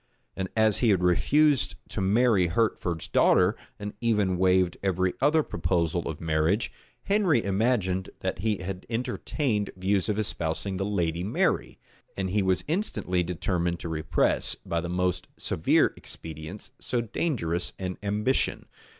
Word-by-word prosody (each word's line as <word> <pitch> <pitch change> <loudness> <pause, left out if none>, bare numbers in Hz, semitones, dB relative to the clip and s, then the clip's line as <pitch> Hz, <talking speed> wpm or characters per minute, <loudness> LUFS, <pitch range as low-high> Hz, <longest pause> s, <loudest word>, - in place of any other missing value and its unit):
And 95 -1 -3
as 110 -2 +3
he 120 - +3
had 95 -3 +3
refused 145 - +3
to 100 - -3
marry 100 -1 +3
Hertford's 85 -3 -1
daughter, 90 +4 +4 0.2
and 105 0 -6
even 105 -5 +2
waived 90 -2 +3
every 95 -1 +1
other 155 +1 +4
proposal 85 - -1
of 80 - -5
marriage, 80 +6 +1 0.3
Henry 195 - +2
imagined 95 -3 +1
that - - -2
he 110 -2 0
had 95 0 -6
entertained 115 -1 -1
views 95 +2 +1
of 105 - 0
espousing 95 -2 -2
the 95 - -1
lady 85 -4 -1
Mary; 100 - 0 0.4
and 95 -1 -2
he 105 +1 +2
was 95 -1 +1
instantly 155 - -1
determined 85 0 -1
to 85 - -5
repress, 80 0 +1
by 85 0 -3
the 85 - -5
most 90 0 -1
severe 80 - +2
expedients, 80 - -8
so 120 -1 -1
dangerous 105 - -2
an 90 -1 -5
ambition. 105 +5 0
95 Hz, 140 wpm, -27 LUFS, 90-110 Hz, 0.4 s, daughter